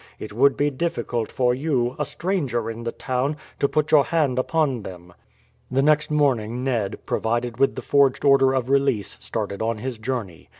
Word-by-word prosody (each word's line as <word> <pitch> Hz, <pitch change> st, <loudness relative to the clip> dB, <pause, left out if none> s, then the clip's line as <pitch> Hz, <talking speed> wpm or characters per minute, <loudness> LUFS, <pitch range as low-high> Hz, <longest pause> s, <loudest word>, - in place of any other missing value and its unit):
It 110 Hz, -, -8 dB
would 135 Hz, +5 st, +3 dB
be 145 Hz, 0 st, +1 dB
difficult 120 Hz, -6 st, -2 dB
for 125 Hz, -1 st, +2 dB
you, 130 Hz, -3 st, 0 dB
a 150 Hz, -, 0 dB
stranger 135 Hz, -, -2 dB
in 115 Hz, +1 st, -8 dB
the 115 Hz, -, -1 dB
town, 130 Hz, +5 st, -2 dB, 0.2 s
to 140 Hz, -, +2 dB
put 155 Hz, -1 st, 0 dB
your 145 Hz, -3 st, +6 dB
hand 150 Hz, -7 st, +1 dB
upon 135 Hz, -3 st, 0 dB
them." 90 Hz, -3 st, -10 dB, 0.6 s
The 135 Hz, +2 st, +1 dB
next 150 Hz, 0 st, +3 dB
morning 125 Hz, -6 st, +1 dB
Ned, 115 Hz, -7 st, -1 dB
provided 120 Hz, +1 st, -1 dB
with 135 Hz, -, +3 dB
the -, -, -6 dB
forged 140 Hz, -1 st, +2 dB
order 135 Hz, -1 st, +5 dB
of 125 Hz, -2 st, -1 dB
release, 135 Hz, -7 st, +1 dB
started 100 Hz, -, -4 dB
on 115 Hz, 0 st, -1 dB
his 125 Hz, 0 st, -5 dB
journey. 110 Hz, -8 st, -5 dB
130 Hz, 180 wpm, -23 LUFS, 115-140 Hz, 0.6 s, your